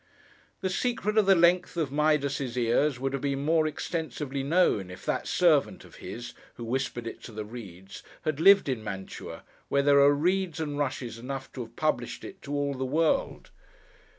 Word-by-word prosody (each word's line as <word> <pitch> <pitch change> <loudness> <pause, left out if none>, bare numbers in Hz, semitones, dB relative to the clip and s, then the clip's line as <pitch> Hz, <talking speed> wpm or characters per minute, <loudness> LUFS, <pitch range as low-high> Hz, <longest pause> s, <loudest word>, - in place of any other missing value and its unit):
The 190 - 0
secret 215 0 -1
of 205 - +2
the 195 - +7
length 175 +1 +3
of 155 -5 -1
Midas's 140 -4 0
ears, 125 +3 +2
would 135 +1 -2
have 140 - -2
been 140 0 -1
more 160 0 +3
extensively 150 -3 -4
known, 140 - +2
if 90 0 -11
that - - -1
servant - - +2
of - - -15
his, 120 +6 -7 0.2
who 120 - -8
whispered 120 -1 -2
it 115 - -7
to - - -9
the 110 -1 -6
reeds, 95 -5 -10 0.2
had 155 -2 -1
lived 195 +2 +7
in 125 -5 -2
Mantua, 95 -2 -7 0.3
where 140 0 +2
there 140 0 +5
are 140 +1 +7
reeds 180 +1 0
and 145 -2 -3
rushes 125 -5 -3
enough 135 +2 -6
to 130 - -5
have 115 0 -9
published 155 -6 -1
it - - -10
to 140 - -8
all 145 -1 0
the 130 0 -4
world. 160 - 0
140 Hz, 185 wpm, -28 LUFS, 120-160 Hz, 0.3 s, the